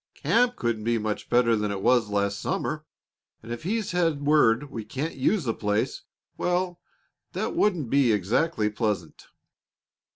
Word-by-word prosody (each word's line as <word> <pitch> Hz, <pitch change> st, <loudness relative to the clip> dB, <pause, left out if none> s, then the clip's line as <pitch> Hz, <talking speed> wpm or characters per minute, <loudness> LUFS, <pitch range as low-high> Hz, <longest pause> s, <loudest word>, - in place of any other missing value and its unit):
"Camp 245 Hz, 0 st, +2 dB
couldn't 115 Hz, -3 st, -2 dB
be 115 Hz, +1 st, +1 dB
much 105 Hz, -1 st, -3 dB
better 120 Hz, -1 st, +4 dB
than 105 Hz, -1 st, -1 dB
it 100 Hz, -1 st, -4 dB
was 120 Hz, -4 st, +3 dB
last 100 Hz, 0 st, 0 dB
summer; -, -, -2 dB, 0.6 s
and 115 Hz, -, -9 dB
if 120 Hz, -, -4 dB
he's 210 Hz, +5 st, -2 dB
had 165 Hz, -5 st, 0 dB
word 145 Hz, -2 st, +3 dB
we 115 Hz, -, -5 dB
can't 135 Hz, +9 st, -4 dB
use 170 Hz, +8 st, +1 dB
the 115 Hz, -3 st, -1 dB
place 105 Hz, 0 st, -1 dB, 0.4 s
well, 180 Hz, 0 st, -1 dB, 0.5 s
that -, -, -2 dB
wouldn't 170 Hz, -, +1 dB
be 135 Hz, -4 st, +4 dB
exactly 110 Hz, -, +1 dB
pleasant." 105 Hz, -6 st, -3 dB
120 Hz, 155 wpm, -26 LUFS, 105-160 Hz, 0.6 s, better